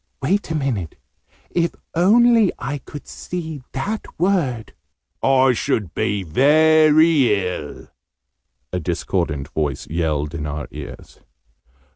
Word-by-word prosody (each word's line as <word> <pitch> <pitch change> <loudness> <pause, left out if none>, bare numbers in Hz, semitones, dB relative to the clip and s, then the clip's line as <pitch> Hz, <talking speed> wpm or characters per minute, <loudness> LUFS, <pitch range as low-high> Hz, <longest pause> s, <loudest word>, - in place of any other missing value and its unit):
"Wait 185 +9 0
a 160 - -2
minute 120 - -2 0.6
if 170 -1 0 0.2
only 225 +4 +5
I 140 +3 -4
could 145 +2 -10
see 160 -5 -6
that 205 +11 -3
word 160 - 0 0.3
" - - -57
"I 130 -1 +4
should 105 -7 -1
be 100 +2 -1
very 150 - +4
ill!', 75 -5 -6 0.9
a 90 - 0
discordant 80 -4 -2
voice 75 -3 -2
yelled 75 -3 -1
in 75 -2 -4
our 75 0 -5
ears. - - -10
135 Hz, 115 wpm, -21 LUFS, -, 0.9 s, only